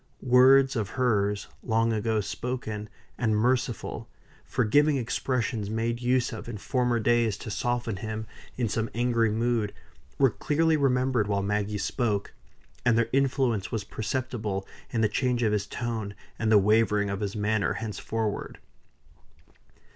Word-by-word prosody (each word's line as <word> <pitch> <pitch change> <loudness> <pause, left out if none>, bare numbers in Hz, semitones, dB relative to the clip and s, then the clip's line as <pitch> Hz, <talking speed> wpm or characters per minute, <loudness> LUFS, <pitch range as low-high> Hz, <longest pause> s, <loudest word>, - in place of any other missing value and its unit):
Words 130 +2 +6
of 105 -5 -1
hers, 105 -5 +1 0.2
long 115 0 +1
ago 110 0 0
spoken, 110 -1 -4 0.3
and 110 -3 +2
merciful, 120 0 -1 0.3
forgiving 145 +5 +2
expressions 115 -3 -1
made 115 +2 -1
use 125 0 +1
of 115 +1 -7
in 110 - -5
former 125 +2 0
days 115 -2 +2
to 110 - -7
soften 120 -2 -1
him 110 +1 -4 0.3
in 120 -2 0
some 110 +1 -1
angry 115 -1 +2
mood, 115 -1 0 0.4
were 135 -3 +4
clearly 160 +7 +1
remembered 130 -5 +2
while 100 -1 0
Maggie 105 +1 -1
spoke; 105 -1 -1 0.5
and 115 -2 +3
their 115 -1 +2
influence 130 -6 +1
was 110 -4 -2
perceptible 110 -2 -3 0.2
in 115 - -1
the 110 - +4
change 120 +2 0
of 105 -2 +2
his 105 -1 -1
tone, 110 -3 -4 0.2
and 110 -1 +1
the 105 - +8
wavering 105 0 +3
of 100 - -3
his 100 -1 -3
manner 105 0 +1
henceforward. 110 -1 -3
115 Hz, 140 wpm, -27 LUFS, 105-125 Hz, 0.5 s, the